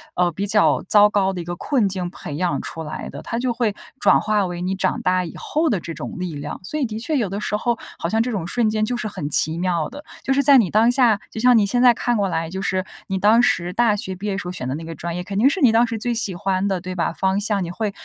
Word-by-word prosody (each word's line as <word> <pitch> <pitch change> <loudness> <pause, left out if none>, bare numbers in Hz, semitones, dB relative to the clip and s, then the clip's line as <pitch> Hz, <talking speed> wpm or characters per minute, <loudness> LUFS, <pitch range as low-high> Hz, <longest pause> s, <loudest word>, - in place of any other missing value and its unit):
呃， 180 0 +2
比 195 +5 -3
较 210 +1 +3
糟 210 0 +6
糕 195 -2 +1
的 185 - -5
一 - - -4
个 175 +1 -4
困 235 +2 +1
境 185 -2 -3
培 150 -4 -8
养 175 +3 -1
出 165 - -6
来 150 - -6
的， - - -8
它 230 - -4
就 250 -1 0
会 230 -3 0 0.3
转 - - +5
化 210 -2 +1
为 175 -1 -5
你 185 +2 -1
长 190 -1 -1
大 185 0 +1
以 165 - -7
后 315 +2 0
的 205 - +1
这 170 - -7
种 - - -7
力 180 -4 -4
量。 145 +1 -6
所 300 - -5
以 290 - 0
的 220 -2 -5
确 305 +7 -2
有 225 -7 0
的 200 +2 -4
时 210 - -2
候， 235 +2 0 0.2
好 170 - -3
像 220 +4 +2
这 240 - -1
种 195 -7 -3
瞬 230 +4 +1
间 215 0 0
就 240 +3 -1
是 230 - -3
很 150 -8 -5
奇 155 +2 +2
妙 175 -3 0
的， 285 +3 -10 0.2
就 270 - +1
是 280 - +3
在 275 0 +7
你 215 -8 +3
当 225 +3 +4
下， 245 -5 +3
就 - - -6
像 250 +2 +5
你 215 - +4
现 245 +5 +1
在 250 -1 +7
看 240 +1 -1
过 200 -1 +1
来， 165 -2 -2
就 190 +2 -5
是 185 -1 0 0.2
你 190 - -2
当 215 +4 +5
时 180 -7 +1
大 230 0 +3
学 190 -2 -4
毕 190 +3 -8
业 200 - -1
时 180 - -5
候 - - -3
选 155 -8 -4
的 130 - -2
那 160 - -6
个 165 0 -7
专 170 +3 -5
业， 180 - -4
肯 195 +2 -5
定 235 - +5
是 370 +5 -2
你 255 -5 +6
当 230 +2 +4
时 230 - -3
最 240 +3 -1
喜 205 -5 -1
欢 190 +1 -1
的， 190 -3 -1
对 185 0 -6
吧？ 170 - -1
方 190 +2 0
向， 205 -2 0
你 170 - -5
会 210 +3 -2
200 Hz, 325 characters per minute, -21 LUFS, 180-230 Hz, 0.3 s, 在